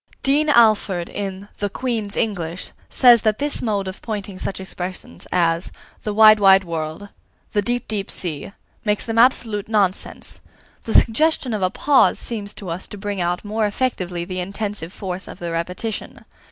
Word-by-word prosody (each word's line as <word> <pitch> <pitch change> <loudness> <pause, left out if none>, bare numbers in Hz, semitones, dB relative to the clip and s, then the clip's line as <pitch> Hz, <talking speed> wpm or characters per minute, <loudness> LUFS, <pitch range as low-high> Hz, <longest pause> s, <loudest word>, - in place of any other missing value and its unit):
Dean 295 +3 +3
Alford, 215 -8 +4
in 195 -1 -5
"The 205 - -1
Queen's 220 -2 -3
English," 175 -5 -2 0.2
says 240 -3 +6
that 215 -1 +1
this 290 0 -1
mode 205 -4 -1
of 190 - -7
pointing 205 -4 -5
such 195 - -3
expressions 180 - -7
as 170 -1 +1 0.3
"the 210 - -3
wide 215 0 +7
wide 195 -1 +6
world," 165 +3 -5 0.4
"the 205 - +1
deep 245 +3 -2
deep 205 -3 -3
sea," 160 -2 -2 0.3
makes 210 -1 0
them 230 0 0
absolute 225 -4 +3
nonsense. 200 -4 -1 0.4
The 225 - -2
suggestion 270 0 +3
of 210 - -2
a 185 - +2
pause 275 +7 +3
seems 210 -3 -5
to 195 - -7
us 170 +3 -4
to 205 - -9
bring 200 -1 -3
out 175 +3 -1
more 215 +1 0
effectively 185 -7 -2
the 185 0 -4
intensive 200 -1 -4
force 190 -1 -6
of - - -9
the 170 -1 -5
repetition. 180 +6 -4
205 Hz, 165 wpm, -21 LUFS, 185-220 Hz, 0.4 s, wide